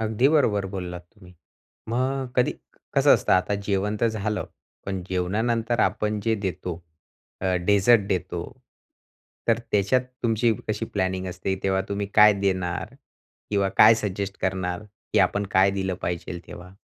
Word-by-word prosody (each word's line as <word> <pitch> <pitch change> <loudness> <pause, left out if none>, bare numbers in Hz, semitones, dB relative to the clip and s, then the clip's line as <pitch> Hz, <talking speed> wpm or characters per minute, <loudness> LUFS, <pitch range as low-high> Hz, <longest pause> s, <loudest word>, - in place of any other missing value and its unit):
अगदी 110 +4 +2
बरोबर 110 -10 +2
बोललात 90 -2 -5
तुम्ही. 90 -4 -17 0.5
मग 130 +3 -1
कधी, 125 - +2 0.4
कसं - - +6
असतं? - - +1
आता 95 +2 +2
जेवण 100 +1 0
तर 115 - +4
झालं. 105 -2 -2 0.4
पण 95 -2 -3
जेवणानंतर 110 +6 0
आपण 105 0 0
जे 110 +2 +1
देतो, 90 -3 -4 0.7
अ, 95 -1 0
डेझर्ट 105 +3 +5
देतो. 95 -4 -2 1.1
तर 115 -1 +4
त्याच्यात 105 +5 +3 0.2
तुमची 115 0 +2 0.2
कशी 110 - -1
प्लॅनिंग 95 -1 -2
असते? 90 +1 -3
तेव्हा 95 0 +1
तुम्ही 100 0 -2
काय 105 0 +8
देणार 95 -3 -1 0.6
किंवा 100 -2 +2
काय 110 +1 +9
सजेस्ट 100 -2 -3
करणार, 95 0 -1
की 105 0 -4
आपण 100 0 +2
काय 95 +1 +5
दिलं 95 -1 -2
पाहिजेल 90 0 -3
तेव्हा? 90 +1 -11
100 Hz, 140 wpm, -25 LUFS, 95-110 Hz, 1.1 s, काय